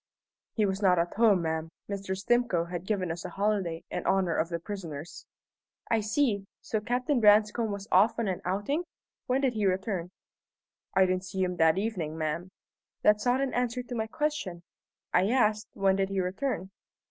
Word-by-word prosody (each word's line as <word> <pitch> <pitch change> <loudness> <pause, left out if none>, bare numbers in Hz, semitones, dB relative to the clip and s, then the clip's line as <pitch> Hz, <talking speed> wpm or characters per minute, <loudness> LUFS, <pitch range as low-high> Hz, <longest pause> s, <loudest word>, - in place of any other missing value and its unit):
"He 215 - +3
was 195 +1 -1
not 185 -3 +4
at 170 +1 0
home, 205 -5 +4
ma'am. 160 0 -2 0.2
Mr. 195 -1 -3
Stimcoe 205 -4 +1
had 175 +1 -5
given 190 -5 0
us 170 +1 -5
a - - -5
holiday 195 -5 -1
in - - -3
honour 190 -3 +2
of 165 - 0
the 170 - -2
prisoners." 170 -4 -7 0.6
"I 225 - +4
see. 215 -2 0
So 220 - -2
Captain 250 +5 0
Branscome 215 +1 +4
was 200 0 -5
off 200 +5 +5
on 230 -2 0
an 185 -2 -2
outing? 205 - -1 0.4
When 255 +2 +2
did 265 -3 +2
he 210 -3 +1
return?" 185 -2 -1 0.9
"I 190 - +6
didn't 185 0 -1
see 190 0 -2
him 180 -1 -2
that 160 +1 +4
evening, 185 -7 -2
ma'am." 160 +3 -2 0.5
"That's 210 +2 +4
not 250 +2 +3
an 275 -1 -1
answer 245 0 -1
to 245 - -8
my 220 -1 -1
question. 225 - -2 0.5
I 190 - +4
asked, 215 -3 +2
When 195 -1 +2
did 195 0 0
he 195 -1 -1
return?" 190 +1 -2
195 Hz, 180 wpm, -29 LUFS, 180-225 Hz, 0.9 s, I